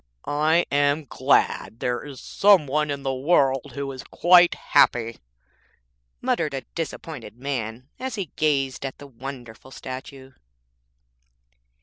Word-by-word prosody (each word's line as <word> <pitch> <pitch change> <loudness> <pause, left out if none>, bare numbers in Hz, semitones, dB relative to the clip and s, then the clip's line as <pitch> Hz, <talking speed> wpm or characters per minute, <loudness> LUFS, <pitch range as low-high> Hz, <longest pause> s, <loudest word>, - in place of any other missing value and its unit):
'I 155 +4 +2
am 145 +2 +2
glad 115 -2 +1
there 120 -1 -2
is 140 -3 -9
some 195 -6 +4
one 150 +2 0
in 140 -1 -3
the 135 -1 -1
world 135 -2 +1
who 140 -1 -3
is 130 -1 -8
quite 175 0 +5
happy', 115 -1 +2 1.0
muttered 155 -4 0
a 135 - -3
disappointed 150 -8 -6
man 125 -2 -4
as 260 -2 -4
he 195 -7 -5
gazed 140 -4 0
at 135 -1 -5
the 145 - -11
wonderful 130 -2 -9
statue. 130 +1 -9
140 Hz, 125 wpm, -24 LUFS, 130-155 Hz, 1.0 s, quite